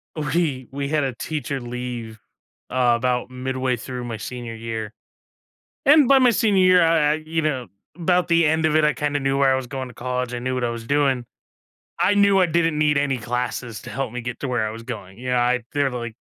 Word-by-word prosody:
We 150 -4 -1
we 140 0 -3
had 150 -1 +1
a 135 -2 -1
teacher 145 0 -3
leave, 120 -2 -6 0.5
uh, 125 -2 +3
about 125 +1 -1
midway 130 0 -2
through 125 +2 -6
my 115 -2 -5
senior 120 +1 -6
year. 110 -1 -5 0.9
And 290 -2 +7
by 275 - +7
my 255 -2 +5
senior 210 -5 +3
year, 185 -1 +6
I 165 -3 +3
I, - - +2
you 155 +1 -3
know, 135 -5 -1 0.3
'bout 180 +1 +1
the 170 -1 +4
end 160 +1 +1
of 155 -1 +2
it, 155 - +4
I 150 - +3
kinda 145 -1 -1
knew 135 0 0
where 135 -1 +4
I - - +2
was 130 -1 -4
going 130 +1 -5
to 125 - -13
college. 125 0 -3
I - - -2
knew 130 +1 -2
what 125 -1 -1
I 120 - 0
was 115 -1 -6
doing. 135 -3 +1 0.7
I 205 - +4
knew 200 -1 +4
I 185 - +5
didn't 165 -2 +1
need 150 -1 +3
any 140 -2 0
classes 120 -1 -3
to - - -9
help 135 -4 -3
me 125 - -4
get 120 0 -6
to 140 - -3
where 120 -4 0
I - - -3
was 115 +1 -8
going, 105 -5 -8
you 125 +1 -4
know, 125 - +2
I 125 +1 +2
they're, 140 -1 +1
like 120 -2 -5
130 Hz, 230 wpm, -22 LUFS, 120-155 Hz, 0.9 s, And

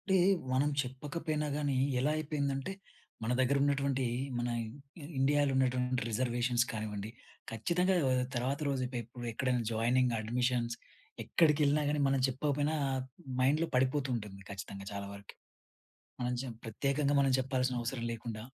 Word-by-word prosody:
అంటే 190 - +4 0.4
మనం 135 +3 +3
చెప్పకపోయినా 150 +4 -3
గానీ 145 -2 0 0.2
ఎలా 140 +4 +2
అయిపోయిందంటే 145 0 -1 0.5
మన 115 - 0
దగ్గర 130 +2 +3
ఉన్నటువంటి 140 -2 +1 0.3
మన 120 0 -1
ఇ 140 +7 -10 0.2
ఇండియాలో 145 +1 +3
ఉన్నటువంటి 125 -1 +1
రిజర్వేషన్స్ 120 +1 +1
కానివ్వండి, 105 -2 -4 0.4
ఖచ్చితంగా 180 - +1
ఆహ్, 130 0 +2
తర్వాత 130 +4 0
రోజు 135 -2 0
ఎప్ 125 - -9 0.4
ఎక్కడైనా 125 +1 0
జాయినింగ్ 120 +2 +2
అడ్మిషన్స్ 120 +1 0 0.5
ఎక్కడికెళ్ళినా 150 -2 +3
గానీ, 150 0 +1
మనం 135 0 +2
చెప్పకపోయినా 145 +3 0 0.6
మైండ్‌లో 150 +6 +3
పడిపోతూ 130 +2 +2
ఉంటుంది 105 -4 -6
ఖచ్చితంగా 100 0 -7
చాలా 100 0 -4
వరకి. 100 0 -11 0.9
మనం 125 0 0
చంప్ 120 -4 -7
ప్రత్యేకంగా 140 +5 +1
మనం 135 -1 +3
చెప్పాల్సిన 130 -1 0
అవసరం 120 0 -3
లేకుండా 115 -1 -5
130 Hz, 130 wpm, -33 LUFS, 120-145 Hz, 0.9 s, అంటే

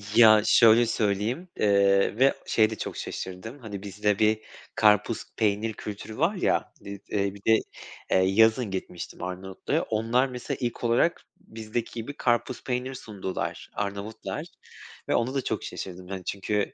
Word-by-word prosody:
Ya, 110 -2 +8
şöyle 115 0 +6
söyleyeyim: 110 - -1
Eee, 100 +1 +3
ve 135 +1 +5
şeye 110 -1 +3
de 110 - -4
çok - - -5
şaşırdım. 105 +9 -6
Hani, 105 -5 -7
bizde 105 +1 -1
bir 110 0 +3 0.4
karpuz, 105 +1 +3
peynir 110 0 +1
kültürü 105 +1 -7
var 170 +8 +2
ya, - - 0
dit 100 -1 -9
eee, 100 -1 0
bir 100 - -12
de, 110 0 +6 0.5
eee, - - +5
yazın 110 +4 +4
gitmiştim 90 -2 -6
Arnavutluk'a. 90 +1 -3
Onlar 115 +4 +1
mesela 125 -1 -5
ilk 120 0 -3
olarak 120 +8 +2 0.2
bizdeki 110 +1 -5
gibi 120 +5 -6
karpuz, 120 +1 0
peynir 125 +1 -2
sundular 100 -6 -5
Arnavutlar 100 +2 -4 0.6
ve - - +3
ona 125 +3 0
da 135 - -1
çok - - -2
şaşırdım. 90 -1 -7
Hani, 95 -1 -6
çünkü 100 +1 -1
110 Hz, 150 wpm, -27 LUFS, 100-120 Hz, 0.6 s, Ya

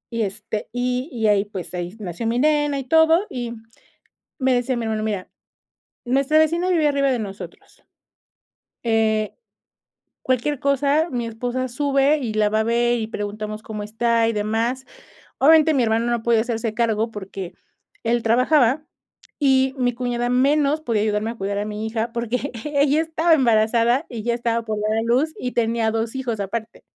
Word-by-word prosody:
Y 230 - 0
este, 210 +1 -4
y 250 +4 -2
y 230 -4 -2
ahí 205 -1 +3
pues 200 -4 -8
ahí 175 +3 -5
nació 190 +2 -4
mi 235 +2 0
nena 295 0 +2
y 270 - -3
todo, 320 +6 +4
y 240 -2 -4 0.9
me 260 -1 +2
decía 245 0 0
mi 235 - -3
hermano: 220 -1 -2
"mira 205 -4 -3 0.8
nuestra 275 +5 +2
vecina 335 +3 +2
vive 320 -4 +3
arriba 275 -2 +2
de 245 - -1
nosotros, 200 -2 -9 1.0
eh, 220 -2 +1 0.9
cualquier 260 +2 -1
cosa 280 +4 +2
mi 240 -2 -2
esposa 245 +3 -3
sube 275 +3 +2
y 235 -6 -3
la 215 -1 +2
va 215 +1 +1
a - - 0
ver, 240 +1 +2
y 220 -2 -3
preguntamos 215 0 -5
cómo 215 -1 -6
está 230 +2 +1
y - - +1
demás", 225 +5 -1 0.5
obviamente 315 +2 +5
mi 255 -3 +3
hermano, 225 +1 +1
no 235 -2 -1
puede 230 -2 +3
hacerse 225 -2 -2
cargo 225 -1 0
porque 195 -3 -7 0.5
él 235 0 0
trabajaba 255 +4 +3 0.5
y 265 -2 +3
mi 245 -1 +1
cuñada 245 0 -2
menos 280 +4 +2
podía 225 -8 0
ayudarme 215 +1 0
a 235 - -7
cuidar 200 -1 -3
a 205 - -1
mi 210 +1 -4
hija, 225 +1 -2
porque 240 +3 -2
ella 290 0 +2
estaba 325 +1 +1
embarazada 235 +2 +2
y 225 -3 -7
ya 235 -1 +1
estaba 235 -1 -1
por 215 -1 -3
dar 215 +1 0
a 225 - 0
luz, 255 +7 +1
y 250 - -3
tenía 230 -1 0
2 225 +2 -2
hijos 240 -5 -3
aparte. 220 +3 -5
235 Hz, 175 wpm, -22 LUFS, 220-270 Hz, 1.0 s, obviamente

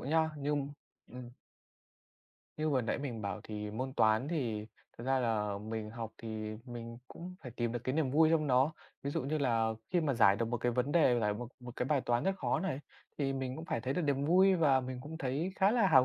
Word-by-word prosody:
nha, 160 +3 +2
như 145 0 -2 0.6
ừm. 125 0 -9 1.3
Như 155 0 0
vừa 135 -3 +3
nãy - - -1
mình 125 -6 -4
bảo 100 -1 -3
thì 105 -1 -5
môn 130 +5 -3
Toán 110 +6 +3
thì 115 -10 -2 0.3
thật 115 - -6
ra 135 +1 +2
là 105 -4 0
mình 110 0 -5
học 115 -1 -6
thì 110 -1 -5
mình 115 -2 -7
cũng 180 +2 -8
phải 125 - -7
tìm 120 -1 0
được 120 - -1
cái 130 - 0
niềm 155 -4 +1
vui 155 +3 +5
trong 160 -2 +3
nó. 130 +3 +4 0.3
Ví 140 - -2
dụ - - -1
như 150 +4 -1
là 115 -5 +2 0.2
khi 180 - +3
mà 145 -4 +1
giải 100 -4 +6
được 115 - 0
một 120 - 0
cái 120 +1 0
vấn 125 +4 0
đề, 140 -8 +5
giải 105 -2 +1
một 120 +2 -6
một 125 -1 -9
cái - - 0
bài 145 -1 +2
toán 120 -1 0
rất 195 0 +1
khó 160 - 0
này 170 -7 -2 0.4
thì 135 -2 +1
mình 130 -1 -3
cũng 160 - -6
phải 115 - -2
thấy 130 +3 -1
được 180 - 0
niềm 140 -2 +1
vui 190 +5 +5
và 145 -7 +4
mình 130 0 -5
cũng 160 +3 -7
thấy 155 +5 -1
khá 195 +1 +4
là 230 -3 +4
hào 130 - +7
130 Hz, 240 wpm, -33 LUFS, 115-155 Hz, 1.3 s, hào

